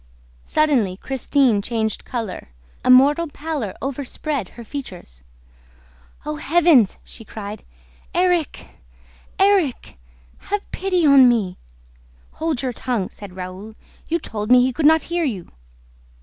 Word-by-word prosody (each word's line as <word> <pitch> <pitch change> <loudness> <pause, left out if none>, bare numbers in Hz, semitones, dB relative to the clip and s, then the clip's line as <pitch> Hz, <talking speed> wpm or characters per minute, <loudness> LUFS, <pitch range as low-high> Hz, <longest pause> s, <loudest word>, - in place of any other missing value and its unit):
Suddenly 255 -12 +2
Christine 265 -3 +1
changed 220 0 -2
color. 225 - -5 0.3
A - - 0
mortal 285 +6 +6
pallor 290 -9 -5
overspread 275 - -3
her 235 - -8
features. 185 - -8 1.0
"Oh 300 0 -3
heavens!" 310 - +4
she - - -12
cried. 210 -1 -8 0.5
"Erik! 355 -4 -1 0.6
Erik! 380 - +1 0.4
Have 410 0 -4
pity 365 -3 0
on 275 -3 +7
me!" 205 -7 0 0.9
"Hold 315 -5 -1
your 255 -2 -2
tongue!" 235 -6 -2
said 200 -3 -11
Raoul. 185 +4 -8 0.3
"You 335 - +1
told 210 -9 -5
me 250 0 +7
he 255 0 0
could 300 +3 +4
hear 345 0 -2
you!" 210 - -4
255 Hz, 120 wpm, -21 LUFS, 215-310 Hz, 1.0 s, on